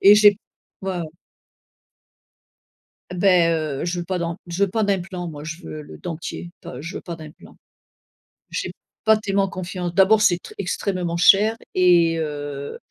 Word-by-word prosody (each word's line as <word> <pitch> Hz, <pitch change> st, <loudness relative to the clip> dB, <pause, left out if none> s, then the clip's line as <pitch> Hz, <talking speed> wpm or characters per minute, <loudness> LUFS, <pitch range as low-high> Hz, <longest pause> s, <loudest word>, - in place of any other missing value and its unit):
et 200 Hz, +1 st, +9 dB
j'ai 205 Hz, -1 st, +6 dB, 0.4 s
ouais, 190 Hz, -1 st, -3 dB
ouais. -, -, -3 dB, 2.1 s
Beh, 180 Hz, -2 st, +4 dB
heu, 155 Hz, -4 st, -1 dB
je 175 Hz, 0 st, -1 dB
veux -, -, -5 dB
pas 185 Hz, +1 st, -2 dB
d'an 170 Hz, -1 st, -2 dB
je 175 Hz, +4 st, +1 dB
veux -, -, -2 dB
pas 220 Hz, +2 st, 0 dB
d'implants 185 Hz, -3 st, -2 dB
moi 150 Hz, -2 st, -8 dB
je 165 Hz, +3 st, -7 dB
veux 155 Hz, -2 st, -7 dB
le 150 Hz, -, -11 dB
dentier. 170 Hz, 0 st, -6 dB
Enfin 125 Hz, -, -8 dB
je 170 Hz, +4 st, -6 dB
veux -, -, -4 dB
pas 170 Hz, -2 st, -7 dB
d'implants. 155 Hz, -1 st, -13 dB, 0.9 s
J'ai -, -, -3 dB, 0.3 s
pas 220 Hz, 0 st, +7 dB
tellement 200 Hz, -2 st, 0 dB
confiance, 180 Hz, -1 st, -4 dB
d'abord 195 Hz, +4 st, +5 dB
c'est 180 Hz, -5 st, +4 dB
très -, -, -12 dB
extrêmement 180 Hz, -2 st, -2 dB
cher 205 Hz, +5 st, +5 dB, 0.2 s
et, 170 Hz, -2 st, +4 dB
heu, 145 Hz, -2 st, -4 dB
175 Hz, 165 wpm, -22 LUFS, 165-195 Hz, 2.1 s, et